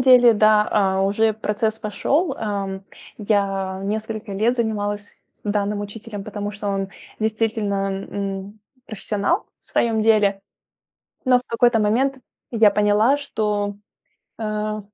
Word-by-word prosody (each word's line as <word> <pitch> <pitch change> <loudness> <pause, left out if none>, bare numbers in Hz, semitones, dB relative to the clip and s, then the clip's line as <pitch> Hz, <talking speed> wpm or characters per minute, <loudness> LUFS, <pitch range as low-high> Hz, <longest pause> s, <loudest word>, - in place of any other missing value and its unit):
деле, 250 -2 +7
да. 215 0 +4
А, 190 -2 +2
уже 215 +3 +2
процесс 220 +1 -1
пошёл. 275 - 0
Эм, 195 -3 -3 0.3
я 195 -2 0
несколько 215 0 -3
лет 220 +5 +1
занималась 205 -3 -3
с - - -22
данным 205 0 0
учителем, 205 0 -7
потому 205 -1 -4
что 205 0 -5
он 195 -1 -1 0.3
действительно, 215 -2 0 0.2
м, 200 +1 -5 0.3
профессионал 215 - -1 0.2
в - - -19
своём 225 -2 +1
деле. 210 -3 +3 0.9
Но 250 -1 +5
в - - -12
какой-то 235 0 +3
момент 255 +6 +1 0.3
я 225 -3 +6
поняла, 210 +6 +3
что, 210 -6 -1 0.7
э, 215 -1 -2
210 Hz, 125 wpm, -22 LUFS, 200-225 Hz, 0.9 s, деле